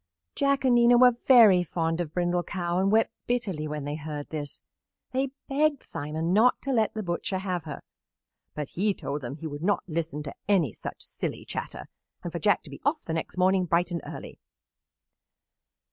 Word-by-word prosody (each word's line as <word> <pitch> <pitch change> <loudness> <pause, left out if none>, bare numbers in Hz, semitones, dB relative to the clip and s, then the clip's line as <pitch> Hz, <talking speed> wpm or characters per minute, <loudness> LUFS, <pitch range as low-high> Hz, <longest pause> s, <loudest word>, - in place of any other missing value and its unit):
Jack 280 -1 +1
and 255 - +5
Nina 240 0 +6
were 250 0 +8
very 230 -6 +6
fond 165 0 -1
of 160 -4 -4
Brindle 175 +1 0
Cow 175 0 -2
and 195 +1 +2
wept 225 +1 +3 0.2
bitterly 200 -11 -1
when 150 -1 -4
they 145 - -3
heard 150 -1 -6
this. 150 -2 -4 0.5
They 265 +1 0 0.2
begged 290 0 +1
Simon 155 +4 -3
not 230 +5 +4
to 275 - -1
let 220 -2 +1
the 215 - -3
butcher 185 +3 -2
have 185 -3 -3
her, 150 -3 -7 0.7
but 150 -2 -4
he 200 +2 0
told 145 +1 -4
them 125 +1 -5
he 165 - -9
would 145 -1 -5
not 200 +4 +1
listen 155 -3 -3
to 140 - -6 0.2
any 170 - +3
such - - -7
silly - - -5
chatter - - -5 0.4
and 175 - -4
for 170 - -4
Jack 205 +2 +2
to - - -12
be - - -10
off 295 +3 0
the 160 - -3
next 165 +2 -4
morning 185 0 +3
bright 175 +1 +1
and 170 - -2
early. - - -9
180 Hz, 190 wpm, -27 LUFS, 160-225 Hz, 0.7 s, were